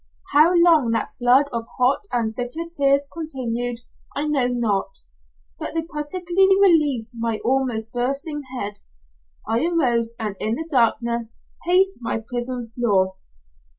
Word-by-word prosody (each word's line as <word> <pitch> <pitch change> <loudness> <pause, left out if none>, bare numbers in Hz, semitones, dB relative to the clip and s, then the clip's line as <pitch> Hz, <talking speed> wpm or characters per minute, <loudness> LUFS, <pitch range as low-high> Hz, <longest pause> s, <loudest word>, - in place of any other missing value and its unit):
How 310 +4 +6
long 335 -7 +5
that 225 - -1
flood 255 +3 +3
of 230 -1 -3
hot 250 +2 +3
and 225 -3 -1
bitter 250 +8 -3
tears 280 -1 +3
continued 245 -7 -3 0.3
I 290 - 0
know 285 -5 +2
not, 215 -6 -1 0.6
but - - -4
they 325 - 0
partially 345 +4 0
relieved 300 - +3
my 230 -1 -2
almost 240 -4 0
bursting 275 +5 -2 0.2
head. 205 -3 -3 0.7
I 225 +4 +1
arose, 240 -9 +1
and 215 -3 -3
in 220 +1 0
the 320 +4 -5
darkness 235 -2 0 0.3
paced 380 +2 +3
my 230 - -2
prison 240 +1 -4
floor. 190 -6 +1
245 Hz, 135 wpm, -22 LUFS, 230-300 Hz, 0.7 s, How